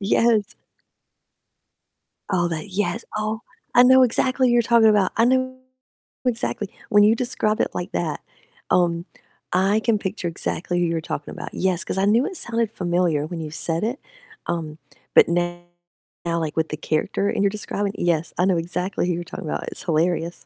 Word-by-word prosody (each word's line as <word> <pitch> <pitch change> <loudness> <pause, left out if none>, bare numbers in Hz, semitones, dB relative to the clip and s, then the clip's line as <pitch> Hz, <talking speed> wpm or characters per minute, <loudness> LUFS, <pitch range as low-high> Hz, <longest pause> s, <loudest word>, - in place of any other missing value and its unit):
Yes. 215 +1 +2 1.7
Oh, 180 -3 +1
that 165 +4 -4
yes. 210 +4 -2
Oh, 215 +1 -2 0.3
I 245 - +7
know 260 +1 +7
exactly 255 +2 +3
who 240 - +3
you're 240 - +5
talking 230 -1 +5
about. 205 -3 +3
I 230 - +4
know 255 +1 +1 0.7
exactly. 225 -4 -1 0.2
When 205 -1 +6
you 215 +2 +5
describe 230 -3 0
it - - 0
like 175 - -4
that, 85 0 -2 0.5
um, 170 -1 +2 0.5
I 195 +4 +3
can 225 -1 +2
picture 195 -2 -4
exactly 175 +1 -2
who 175 - +2
you're 165 -1 0
talking 155 -3 -5
about. - - -8
Yes, 185 -1 +1
'cause - - -3
I 190 - +2
knew 225 +6 +3
it 380 - -5
sounded 230 -2 0
familiar 175 -6 0
when 170 +1 -6
you 155 -1 -5
said 165 +3 0
it, 240 +5 -2 0.5
um, 160 -3 -3 0.4
but - - +7
now, 175 0 -1 0.6
like 165 -2 -2
with 160 0 +1
the 155 - -4
character 155 +6 -1
and - - -1
you're 200 - +4
describing, 205 -1 -3
yes, 165 -2 0
I 180 - +2
know 185 -2 +2
exactly 180 +3 -2
who 180 - +1
you're 175 +1 -3
talking 170 - -8
about, - - -3
it's - - -4
hilarious. 170 +1 -1
190 Hz, 180 wpm, -23 LUFS, 170-220 Hz, 1.7 s, I